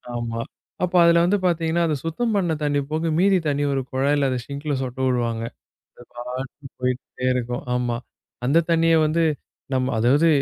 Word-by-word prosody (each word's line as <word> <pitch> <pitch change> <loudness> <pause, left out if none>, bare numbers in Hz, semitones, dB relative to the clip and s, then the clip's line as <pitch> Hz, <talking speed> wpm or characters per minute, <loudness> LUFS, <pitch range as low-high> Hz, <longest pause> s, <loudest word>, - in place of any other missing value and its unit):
ஆமா. 115 -1 -3 0.4
அப்போ 180 0 +1
அதுல 170 0 +5
வந்து 205 +4 +3
பாத்தீங்கன்னா, 170 -1 +1
அந்த 155 - 0
சுத்தம் 220 +8 -1
பண்ண 175 -4 +1
தண்ணி 145 -1 +1
போக 160 +1 0
மீதி 195 0 +4
தண்ணி 145 0 0
ஒரு 135 - 0
குழாயில, 140 +1 +2
அத 130 - -1
சிங்கல 145 +1 -3
சொட்ட 130 0 -5
விடுவாங்க.அது 115 -2 -2 0.5
பாட்டுக்கு 130 +3 -6
போயிட்டே 125 0 -2
இருக்கும். 125 -1 -2
ஆமா. 120 -1 0 0.5
அந்தத் 165 +5 +3
தண்ணிய 165 0 +4
வந்து 165 +2 +1 0.5
நம்ம 130 0 0
அதாவது 140 +8 +4
145 Hz, 155 wpm, -23 LUFS, 125-165 Hz, 0.5 s, அதுல